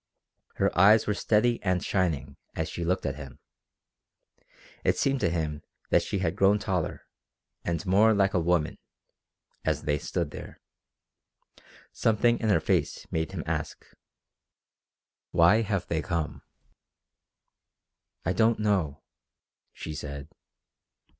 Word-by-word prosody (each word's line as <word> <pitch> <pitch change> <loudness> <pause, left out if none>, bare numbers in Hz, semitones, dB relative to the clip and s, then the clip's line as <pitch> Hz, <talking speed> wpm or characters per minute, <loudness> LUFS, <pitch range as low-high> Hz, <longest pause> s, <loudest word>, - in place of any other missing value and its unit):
Her - - 0
eyes 105 +5 +6
were 105 - +1
steady 115 +3 +1
and 90 -2 0
shining 75 -7 -1 0.2
as 80 - -2
she 85 - -5
looked 90 +2 0
at 70 +1 -2
him. 70 -4 -10 1.5
It - - +2
seemed 135 0 +1
to 90 - +1
him 80 -3 -2 0.3
that - - +5
she - - -3
had 90 -2 -1
grown 100 +1 +4
taller, 95 -5 -3 0.6
and 85 +1 -2
more 100 +4 +5
like 100 -1 +2
a 90 - +3
woman, 85 -2 0 0.8
as - - -1
they 75 -1 0
stood - - -3
there. - - -9 1.3
Something 115 +2 +2
in 110 - 0
her 100 - +4
face - - -1
made 80 -2 -1
him - - -4
ask: - - -4 1.4
"Why 85 +6 +5
have 100 -4 -1
they 80 -1 -1
come?" 85 -4 -3 1.8
"I 90 - +1
don't 115 +2 +3
know," 95 -9 0 0.7
she 80 - -7
said. 70 -1 -7
90 Hz, 125 wpm, -27 LUFS, 80-105 Hz, 1.8 s, eyes